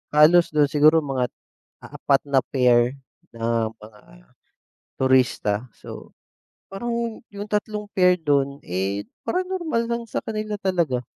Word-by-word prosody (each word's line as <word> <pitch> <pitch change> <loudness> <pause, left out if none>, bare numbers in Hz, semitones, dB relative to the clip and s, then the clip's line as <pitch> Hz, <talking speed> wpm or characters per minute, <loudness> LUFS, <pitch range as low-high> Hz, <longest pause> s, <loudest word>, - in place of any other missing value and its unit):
halos 155 +1 +5
do'n 145 -2 +3
siguro 155 +1 +5
mga 130 -3 -1 0.6
4 140 -1 0
na 140 -2 +2
pair 125 -1 +3 0.4
na 115 -1 0
mga 105 -1 -16 1.0
turista, 125 -4 +1
so, - - -11 0.6
parang 235 +3 -4
yung 205 +1 -6
tatlong 210 0 -2
pair 180 -1 +5
do'n, 140 -2 0
eh, 95 +3 -2 0.2
parang 365 +1 -1
normal 315 -11 -1
lang 235 0 -1
sa - - -4
kanila 215 -1 -4
talaga. 170 -10 0
145 Hz, 125 wpm, -23 LUFS, 125-210 Hz, 1.0 s, halos